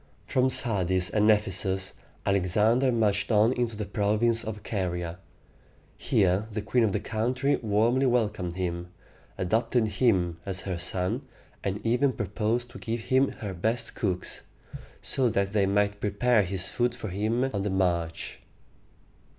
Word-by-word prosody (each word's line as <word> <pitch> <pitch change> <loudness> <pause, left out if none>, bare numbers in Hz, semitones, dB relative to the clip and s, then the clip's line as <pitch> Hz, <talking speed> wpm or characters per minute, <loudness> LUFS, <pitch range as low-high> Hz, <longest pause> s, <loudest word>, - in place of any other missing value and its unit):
From 130 0 +2
Sardis 95 -6 +2
and 105 0 +3
Ephesus, 95 -2 +1 0.3
Alexander 105 +7 +2
marched 105 -2 +1
on 110 +3 +4
into 120 -4 -2
the 105 - -3
province 110 +3 +1
of 110 -1 -6
Ca´ri 90 -4 -2
a. 85 +2 -7 0.8
Here 95 +3 +1
the 105 0 -3
queen 120 +3 +2
of 110 - +2
the 105 - 0
country 125 +6 0
warmly 115 +5 +2
welcomed 105 -8 0
him, 90 -1 -3 0.5
adopted 110 +4 +1
him 95 -8 +1
as 95 -1 -4
her 90 -3 -4
son, 90 +7 -1 0.4
and 100 +3 -3
even 125 +4 +2
proposed 110 +3 -2
to - - -10
give 115 0 -3
him 135 +1 +5
her 100 -3 -4
best 110 +6 -2
cooks, 95 -6 -3 0.6
so 130 -3 +2
that 100 -1 0
they 100 -2 +3
might 100 +1 +1
prepare 105 +3 +2
his 95 -1 -2
food 120 0 0
for 110 -4 -6
him 110 +6 0
on 100 - -1
the 105 - -1
march. 85 -3 -1
105 Hz, 150 wpm, -27 LUFS, 95-115 Hz, 0.8 s, him